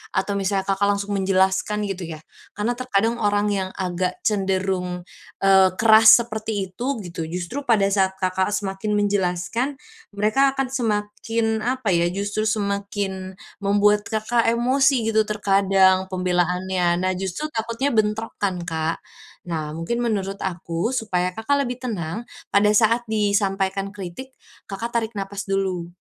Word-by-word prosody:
atau 200 Hz, +1 st, 0 dB
misalnya 195 Hz, 0 st, 0 dB
Kakak 195 Hz, +1 st, +1 dB
langsung 200 Hz, 0 st, -1 dB
menjelaskan 190 Hz, +2 st, +1 dB
gitu 190 Hz, -4 st, -4 dB
ya, 155 Hz, -1 st, -8 dB, 0.3 s
karena 210 Hz, +4 st, -1 dB
terkadang 230 Hz, -2 st, 0 dB
orang 205 Hz, -1 st, +1 dB
yang 190 Hz, -2 st, -1 dB
agak 180 Hz, -1 st, -2 dB
cenderung, 190 Hz, -3 st, -1 dB, 0.4 s
eee, 190 Hz, -1 st, +6 dB
keras 220 Hz, +2 st, +7 dB
seperti 215 Hz, -4 st, -4 dB
itu 255 Hz, +8 st, -2 dB
gitu, 170 Hz, -2 st, -5 dB
justru 180 Hz, -, -4 dB
pada 220 Hz, -4 st, +4 dB
saat 190 Hz, -1 st, +2 dB
Kakak, 190 Hz, +2 st, 0 dB
semakin 200 Hz, +1 st, -2 dB
menjelaskan, 205 Hz, +6 st, 0 dB, 0.4 s
mereka 270 Hz, +7 st, +2 dB
akan 270 Hz, -2 st, -1 dB
semakin 220 Hz, -1 st, -1 dB
apa 245 Hz, -1 st, -1 dB
ya, 170 Hz, -1 st, +3 dB
justru 205 Hz, +4 st, -2 dB
semakin 200 Hz, -2 st, -2 dB, 0.2 s
membuat 205 Hz, +1 st, +2 dB
Kakak, 225 Hz, +2 st, 0 dB
emosi 245 Hz, 0 st, +2 dB
gitu 220 Hz, -1 st, +2 dB
terkadang 195 Hz, -2 st, +3 dB
pembelaannya. 180 Hz, -1 st, 0 dB
Nah, 185 Hz, -, +2 dB
justru 195 Hz, -, -4 dB
takutnya 230 Hz, +3 st, -1 dB
bentrok, 215 Hz, 0 st, 0 dB
kan, 185 Hz, -4 st, -1 dB
Kak. 160 Hz, -1 st, -3 dB, 0.4 s
Nah, 155 Hz, -3 st, -3 dB
mungkin 165 Hz, +9 st, -2 dB
menurut 200 Hz, -4 st, -2 dB
aku, 175 Hz, +2 st, -2 dB
supaya 185 Hz, -6 st, 0 dB
Kakak 280 Hz, +4 st, 0 dB
lebih 250 Hz, 0 st, -5 dB
tenang 210 Hz, -3 st, -3 dB, 0.3 s
pada 200 Hz, +1 st, +4 dB
saat 230 Hz, +2 st, +3 dB
disampaikan 200 Hz, -2 st, 0 dB
kritik, 200 Hz, +6 st, -8 dB, 0.4 s
Kakak, 225 Hz, +4 st, -5 dB
tarik 225 Hz, -1 st, 0 dB
napas 200 Hz, 0 st, -5 dB
dulu. 190 Hz, -3 st, -1 dB
200 Hz, 135 wpm, -22 LUFS, 190-220 Hz, 0.4 s, keras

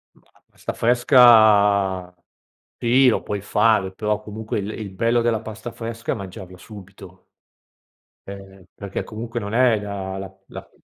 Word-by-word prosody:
La -, -, -29 dB, 0.2 s
pasta -, -, -6 dB
fresca, 105 Hz, -7 st, +4 dB, 0.6 s
sì 125 Hz, +3 st, +3 dB
lo 120 Hz, -, +2 dB
puoi 105 Hz, -1 st, -4 dB
fare 105 Hz, -2 st, +1 dB
però, 105 Hz, +1 st, -2 dB
comunque, 110 Hz, 0 st, -5 dB
il 100 Hz, +1 st, -5 dB
il 105 Hz, -3 st, -7 dB
bello 115 Hz, +5 st, +1 dB
della 115 Hz, -2 st, 0 dB
pasta 110 Hz, +1 st, -8 dB
fresca 115 Hz, 0 st, -6 dB
è -, -, -1 dB
mangiarla 95 Hz, -2 st, -10 dB
subito 95 Hz, -2 st, -13 dB, 1.1 s
ehm, 95 Hz, -1 st, -11 dB
perché 100 Hz, -1 st, -6 dB
comunque 115 Hz, +2 st, -6 dB
non 105 Hz, 0 st, -6 dB
è 120 Hz, -3 st, +3 dB
da 95 Hz, -2 st, -6 dB
la 95 Hz, -1 st, -8 dB
la -, -, -11 dB
105 Hz, 145 wpm, -21 LUFS, 95-115 Hz, 1.1 s, fresca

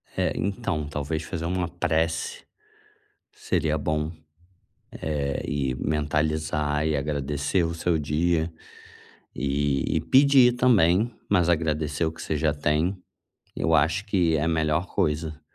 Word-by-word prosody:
É, -, -, 0 dB
então 85 Hz, -6 st, -2 dB
talvez 75 Hz, +2 st, -3 dB
fazer 80 Hz, 0 st, -5 dB
uma 90 Hz, 0 st, -1 dB
prece 80 Hz, -1 st, -1 dB, 0.9 s
seria 80 Hz, -1 st, -1 dB
bom, 75 Hz, +2 st, -1 dB, 0.8 s
eh, 70 Hz, -3 st, -2 dB
e 70 Hz, -3 st, -1 dB
mentalizar 75 Hz, +1 st, 0 dB
e 75 Hz, -2 st, +1 dB
agradecer 75 Hz, +4 st, -1 dB
o 85 Hz, 0 st, -2 dB
seu 85 Hz, -1 st, 0 dB
dia. 80 Hz, +3 st, 0 dB, 0.8 s
E 70 Hz, +1 st, 0 dB
e -, -, 0 dB
pedir 130 Hz, -, +5 dB
também, 115 Hz, -3 st, +3 dB, 0.2 s
mas 90 Hz, -4 st, +3 dB
agradecer 80 Hz, -1 st, 0 dB
o 80 Hz, -, -1 dB
que 80 Hz, -, -11 dB
você 80 Hz, -, -2 dB
já 75 Hz, 0 st, +1 dB
tem, 75 Hz, +6 st, 0 dB, 0.6 s
eu 80 Hz, -, +1 dB
acho 80 Hz, +7 st, +2 dB
que 90 Hz, -6 st, +2 dB
é 75 Hz, -, -1 dB
a 85 Hz, -, +1 dB
melhor 80 Hz, +2 st, +1 dB
coisa. 80 Hz, -4 st, -2 dB
80 Hz, 130 wpm, -25 LUFS, 75-85 Hz, 0.9 s, pedir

